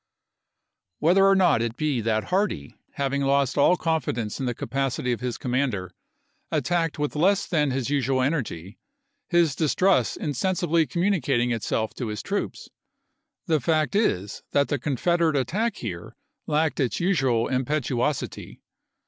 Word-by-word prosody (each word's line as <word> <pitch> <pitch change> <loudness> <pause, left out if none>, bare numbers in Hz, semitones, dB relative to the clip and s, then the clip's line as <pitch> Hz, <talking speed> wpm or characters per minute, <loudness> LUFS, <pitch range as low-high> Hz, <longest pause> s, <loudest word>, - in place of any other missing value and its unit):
Whether 190 +5 +4
or 195 - +5
not 175 -10 +4
it 115 0 -3
be 150 -6 0
that 110 0 0
Hardee, 180 - -1 0.2
having 140 0 -1
lost 140 -1 +2
all 145 +5 +5
Aug.3i,i864. - - -22
confidence 125 -10 -1
in 130 - -2
the 120 - -2
capacity 130 0 -2
of 120 - -1
his 125 -2 -3
commander, 125 -8 -1 0.6
at - - 0
tacked 170 -3 0
with 150 0 -2
less 195 +6 +3
than 150 -4 +1
his 135 0 -2
usual 135 -2 +1
energy, 115 - -3 0.5
his 170 -5 +3
distrust 160 - +2
insensibly 170 +1 0
communicating 155 -10 +1
itself 110 -1 -1
to 125 - -4
his 105 -1 -5
troops, - - -3 0.8
the 160 -2 +2
fact 155 +6 0
is 105 - 0
that 140 0 +2
the 145 - 0
Confederate 160 +3 +1
attack 195 - 0
here 90 -7 -6 0.3
lacked 155 +1 +1
its 130 -4 0
usual 135 -11 +1
impetuosity. 130 +1 -2
140 Hz, 145 wpm, -25 LUFS, 120-165 Hz, 0.8 s, or